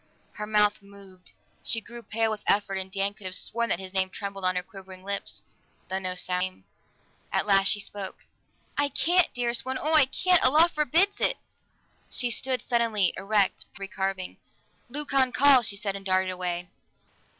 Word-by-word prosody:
Her 210 0 -7
mouth 210 -1 +2
moved; 200 -2 -14 0.3
she 225 - 0
grew 235 +1 -11
pale 225 0 -1
with 215 - -4
effort 200 -1 +1
and 190 0 -4
Dan 195 +1 0
could 205 -2 -9
have 185 - -2
sworn 235 0 -2
that - - +1
his 190 0 -8
name 190 -1 +2
trembled 195 +1 -6
on 185 0 +1
her 180 - -1
quivering 190 0 -12
lips, 200 0 -3 0.5
though 190 +1 -1
no 185 -1 -3
sound 180 0 -1
came. 185 - -4 0.7
At - - 0
last 195 -1 +4
she 205 - +1
spoke. 200 -1 -6 0.5
"I 285 0 +2
can't, 350 +6 +3
dearest 240 -1 -1
one! 260 0 -3
Oh, 310 +2 +1
I 305 -3 +8
can't! 360 +6 +2
A - - +6
law 315 +5 +6
forbids 330 +5 +1
it!" - - +3 0.7
She 245 -2 0
stood 255 +2 +1
suddenly 230 -5 +1
erect, 195 +3 -9
pallid 205 -3 +4
as - - -11
an - - -35
ivory 195 0 -6
carving. 190 -2 -3 0.5
"Leucon 270 -1 +1
calls!" 260 -3 +6
she 200 - -1
said, 200 -2 -2
and 195 - -7
darted 185 -1 +1
away. 180 -1 -3
205 Hz, 195 wpm, -26 LUFS, 190-245 Hz, 0.7 s, I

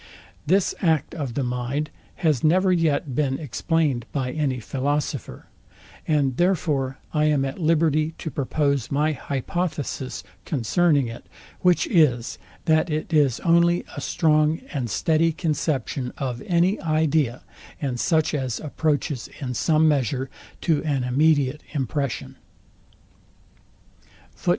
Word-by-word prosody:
This 190 +3 +3
act 160 -5 +1
of 140 -8 -4
the 140 - 0
mind 125 +5 -2 0.3
has 150 -6 +2
never 185 +4 +4
yet 155 -6 +1
been 135 -1 0
explain'd 145 -3 -1
by 130 -3 -2
any 140 -4 -1
philosopher; 140 +1 -3 0.6
and 140 -5 +1
therefore 150 -7 +1 0.2
I 150 -1 +2
am 145 -3 +2
at 135 +6 -5
liberty 160 -1 +2
to 160 - -5
propose 140 -1 0
my 150 +2 +1
hypothesis 140 - -3 0.2
concerning 145 - +2
it; 115 0 -8 0.3
which 180 - +3
is, 150 - +2 0.3
that 160 +2 +3
it 155 +2 -3
is 140 -6 +3
only 170 0 +3
a - - -5
strong 155 -1 +2
and 130 -6 -2
steady 160 +8 +2
conception 145 -6 -2
of 125 -3 -3
any 180 +3 +2
idea, 155 -5 +1 0.4
and 130 -4 -2
such 160 +1 +2
as 130 -5 -2
approaches 150 -3 -1
in 130 -4 -3
some 155 +5 +3
measure 135 -2 0 0.3
to 160 -4 +1
an 140 -5 0
immediate 145 +2 +2
impression. 140 -1 -3
150 Hz, 120 wpm, -24 LUFS, 130-160 Hz, 0.6 s, never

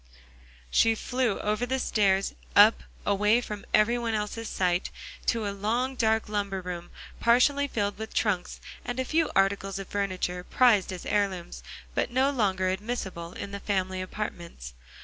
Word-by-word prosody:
She 225 0 +4
flew 245 -2 -1
over 210 +3 0
the 260 +1 0
stairs 195 -6 +1 0.2
up, 210 +2 +7 0.2
away 210 +3 +3
from 210 -4 -6
every 235 +3 +4
one's 225 -1 -2
sight, 180 -1 0 0.4
to 225 -3 +1
a 200 - -2
long, 230 +6 -1
dark 220 -3 +1
lumber 200 -2 -2
room, 175 -1 -6 0.3
partially 280 +4 +4
filled 205 -5 -2
with 220 0 -5
trunks, 190 -5 -1 0.2
and 245 +1 -4
a 260 - 0
few 320 +3 +1
articles 195 0 +1
of 195 -1 -7
furniture, 185 -3 -2
prized 220 -3 +3
as 185 -2 -7
heirlooms, 195 -4 -1 0.3
but - - 0
no 260 +3 +2
longer 190 -7 +1
admissible 190 -4 -4
in 200 - -6
the 200 - -5
family 190 -2 -1
apartments. 170 - -6
205 Hz, 150 wpm, -27 LUFS, 190-230 Hz, 0.4 s, up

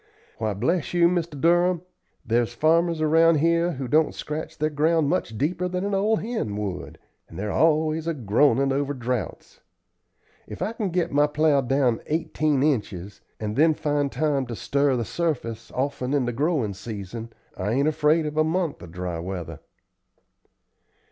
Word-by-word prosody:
Why, 110 -2 -1
bless 165 - -1
you, 170 -1 +5
Mr. 170 -4 -2
Durham, 175 +2 +3 0.4
there's 120 +1 0
farmers 165 +3 +2
around 165 +1 +5
here 170 +3 +2
who 135 -2 -5
don't 155 +5 +2
scratch 155 +1 -5
their 155 0 0
ground 155 0 +2
much 145 -10 -1
deeper 175 +7 0
than 180 +1 -2
an 205 - -2
old 210 +3 +2
hen 215 - -3
would, 100 -3 -5 0.3
and - - -11
they're 105 +1 -3
always 155 +2 +2
groanin' 135 -1 +2
over 145 +1 -1
droughts. 125 -1 -4 0.9
If - - -8
I 220 - -2
can 215 -4 -2
get 175 -1 -1
my 145 +1 +4
plow 150 -1 +2
down 130 -2 +1
eighteen 150 -3 0
inches, 105 - -2 0.2
and 105 -1 -3
then 160 +3 +4
find 145 -2 0
time 140 -1 0
to 120 - -5
stir 140 +3 +1
the 120 -2 -1
surface 115 - -3
often 130 0 -2
in 135 -3 +1
the 120 - -2
growin' 140 - 0
season, 110 +2 -7 0.2
I 95 +2 -3
ain't 140 +4 +2
afraid 155 +1 +2
of 150 0 -4
a 155 - +5
month 165 0 -1
of 85 - -10
dry 90 -1 -4
weather." 90 -1 -6
145 Hz, 165 wpm, -24 LUFS, 120-165 Hz, 0.9 s, you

